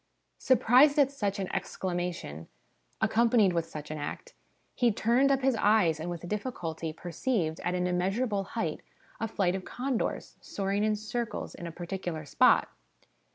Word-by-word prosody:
' - - -49
Surprised 260 +4 +6
at 280 -2 +4
such 205 -8 -2
an 195 - -2
excla 185 -2 -3
mation, 170 - -4 0.5
accompanied 225 -4 +4
with 165 -1 -1
such 150 -2 -8
an 155 - -4
act, 480 - -6 0.4
he 240 -2 +3
turned 240 +6 +3
up 270 -1 +1
his 265 -2 +3
eyes, 205 -7 +3
and 165 +3 -4
with 175 0 -6
difficulty 175 -7 -4
perceived, 170 - -2
at 180 - -2
an 180 0 0
immeasurable 195 +4 0
height, 165 -8 -2 0.4
a 225 - -1
flight 195 -4 0
of 190 -1 -4
condors, 255 +2 -3
soaring 200 +1 -2
in 215 0 +2
circles 220 +2 -4
in 170 - -7
a - - -6
particular 175 -2 -5
spot. - - +4
195 Hz, 160 wpm, -29 LUFS, 170-235 Hz, 0.5 s, Surprised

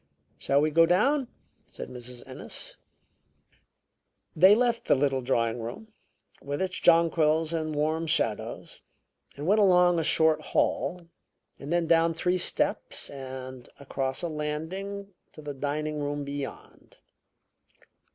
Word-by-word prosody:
"Shall 140 +1 +2
we 155 +1 +1
go 165 +2 +5
down?" 260 - +2 0.4
said - - -8
Mrs. 125 -1 -10
Ennis. - - -6 1.6
They 185 +5 +7
left 235 0 0
the - - +4
little 135 -1 +1
drawing 115 -2 0
room, 120 - -7 0.5
with 145 +1 -4
its 190 -1 -2
jonquils 165 -1 +3
and 155 -2 -2
warm 155 +2 0
shadows, 150 -9 -1 0.6
and 145 - -5
went 210 +5 +4
along 180 -3 +5
a - - 0
short 155 0 +3
hall, 175 +3 -1 0.5
and 140 +3 -7
then 175 -1 +2
down 165 0 +3
three 180 +2 0
steps - - -1
and 130 -2 -8
across 135 0 -3
a - - 0
landing 175 +7 -5 0.2
to - - -11
the 145 -1 -5
dining 150 +2 -3
room 145 0 -3
beyond. 140 -1 -8
155 Hz, 130 wpm, -27 LUFS, 140-175 Hz, 1.6 s, They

